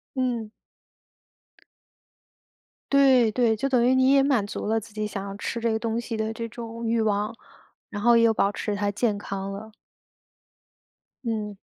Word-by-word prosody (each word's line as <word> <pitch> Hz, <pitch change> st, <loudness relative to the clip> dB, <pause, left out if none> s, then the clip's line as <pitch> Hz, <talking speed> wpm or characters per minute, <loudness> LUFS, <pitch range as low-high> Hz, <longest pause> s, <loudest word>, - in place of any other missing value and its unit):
嗯。 245 Hz, -4 st, -1 dB, 2.4 s
对， 265 Hz, -5 st, +5 dB
对， 230 Hz, -1 st, +2 dB
就 245 Hz, +6 st, -1 dB
等 250 Hz, -3 st, +2 dB
于 255 Hz, +2 st, +4 dB
你 260 Hz, +1 st, +4 dB
也 275 Hz, -1 st, +6 dB
满 270 Hz, -7 st, +2 dB
足 205 Hz, -, -5 dB
了 225 Hz, +1 st, +2 dB
自 220 Hz, 0 st, -14 dB
己 215 Hz, 0 st, -2 dB
想 200 Hz, -1 st, -5 dB
要 195 Hz, -, -6 dB
吃 235 Hz, -, -3 dB
这 230 Hz, 0 st, 0 dB
个 220 Hz, -, 0 dB
东 230 Hz, 0 st, -1 dB
西 235 Hz, -1 st, -4 dB
的 220 Hz, 0 st, -2 dB
这 230 Hz, +1 st, -5 dB
种 230 Hz, 0 st, -7 dB
欲 230 Hz, 0 st, +1 dB
望， 210 Hz, +1 st, 0 dB, 0.5 s
然 205 Hz, -, -5 dB
后 235 Hz, +2 st, +5 dB
也 230 Hz, -, +5 dB
有 225 Hz, -1 st, +5 dB
保 200 Hz, -1 st, +2 dB
持 205 Hz, 0 st, -3 dB
它 205 Hz, 0 st, 0 dB
健 210 Hz, 0 st, 0 dB
康 195 Hz, -1 st, -5 dB
了。 215 Hz, +2 st, -8 dB, 1.5 s
嗯。 210 Hz, -3 st, -3 dB
225 Hz, 185 characters per minute, -25 LUFS, 210-235 Hz, 2.4 s, 也